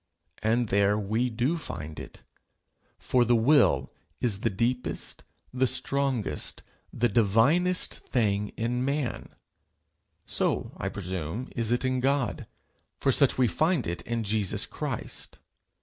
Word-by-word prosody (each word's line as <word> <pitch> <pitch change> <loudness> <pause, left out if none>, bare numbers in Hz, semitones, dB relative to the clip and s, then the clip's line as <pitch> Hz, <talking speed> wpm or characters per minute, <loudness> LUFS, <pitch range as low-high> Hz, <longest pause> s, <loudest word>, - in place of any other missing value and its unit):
And 115 +1 +1
there 100 +1 +3
we 110 +4 0
do 125 +8 0
find 80 - -7
it. - - -11 0.7
For 125 -1 +2
the 120 0 +3
will 130 +4 +4 0.3
is 110 -5 0
the 115 - +1
deepest, 120 +5 -2 0.3
the 130 +1 +2
strongest, 130 - 0 0.3
the 120 - +1
divinest 120 - +2
thing 105 -4 0
in 120 +2 -1
man; 140 -1 -2 1.0
so, - - -1
I - - -2
presume, 95 - -4
is 115 -1 -1
it 120 +2 +1
in 130 0 +1
God, 135 -2 0 0.5
for - - +2
such - - +4
we 130 -1 +4
find 160 - +1
it 85 0 -3
in 115 0 -2
Jesus 105 -2 0
Christ. - - -5
120 Hz, 130 wpm, -28 LUFS, 105-130 Hz, 1.0 s, will